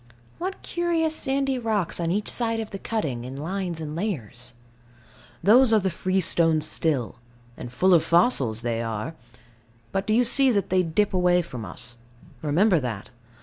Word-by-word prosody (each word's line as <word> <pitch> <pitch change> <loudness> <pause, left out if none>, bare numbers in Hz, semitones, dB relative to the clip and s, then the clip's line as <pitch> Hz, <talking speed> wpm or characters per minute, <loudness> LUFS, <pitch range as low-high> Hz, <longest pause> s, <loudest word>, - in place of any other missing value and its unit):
What 375 +3 -5
curious 335 -2 0
sandy 270 -2 -1
rocks 215 -8 -1
on 170 -1 -1
each 205 +4 -1
side 230 -2 -1
of 220 -1 -5
the 195 - -6
cutting, 145 - -3
in 130 +2 -7
lines 175 +2 -3
and 155 -1 -5
layers. 130 - -4 0.9
Those 235 +6 +6
are 220 - +5
the 190 -2 -1
freestone 170 -3 +2
still: 150 -6 -1 0.4
and 120 - -8
full 185 +9 +3
of 165 - +5
fossils 140 - +2
they 115 -1 -1
are. 115 +6 -4 0.8
But 195 0 -2
do 215 - +2
you 245 - +4
see 265 +3 +4
that 205 -7 0
they 185 0 +4
dip 180 +5 0
away 180 -1 +3
from 120 -7 -7
us? 120 +6 -5 0.4
Remember 175 +5 +3
that. 115 -6 -5
180 Hz, 165 wpm, -25 LUFS, 145-220 Hz, 0.9 s, Those